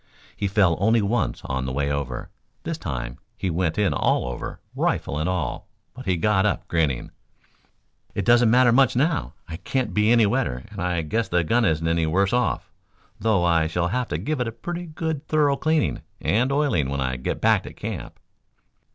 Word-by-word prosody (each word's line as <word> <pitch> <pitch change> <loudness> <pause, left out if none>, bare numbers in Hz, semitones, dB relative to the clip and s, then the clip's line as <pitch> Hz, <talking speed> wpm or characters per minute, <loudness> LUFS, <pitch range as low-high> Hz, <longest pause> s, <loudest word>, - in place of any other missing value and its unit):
He 100 - -1
fell 95 -4 +3
only 110 +3 +3
once 100 - -1
on 65 0 -2
the - - -2
way 70 +2 -1
over. 70 -4 -4 0.3
This - - -4
time - - -5 0.2
he 95 - -2
went 85 -1 0
in 105 -3 +2
all - - +1
over, 60 -1 -5 0.2
rifle 75 - -1
and 80 +3 0
all, 90 -8 -2 0.3
but 130 -2 -10
he 90 -2 +2
got 95 +2 +2
up 105 -2 0
grinning. 75 -7 0 1.0
"It 100 - -1
doesn't 120 0 +5
matter 125 +1 +5
much 130 +1 +4
now. 150 +5 0
I 80 - -6
can't 125 +7 -2
be 105 +1 +3
any 115 -2 +5
wetter, 100 - -1
and - - -6
I 90 -2 0
guess 110 +9 -1
the 90 -1 +1
gun 115 +8 +2
isn't 80 -3 +1
any 85 0 +2
the - - -1
worse 95 +5 +2
off, 125 -4 0 0.5
though 105 -4 +2
I 85 -2 +3
shall 85 +2 -1
have 125 +4 -1
to - - -2
give 155 -1 -2
it 125 - 0
a - - -3
pretty 175 +10 -6 0.4
thorough 150 -3 +3
cleaning 155 +1 0 0.2
and 125 +6 +1
oiling 140 - +1
when 70 0 -2
I 65 -1 -1
get 60 - -3
back - - +4
to - - -7
camp." - - -6
100 Hz, 195 wpm, -24 LUFS, 80-120 Hz, 1.0 s, doesn't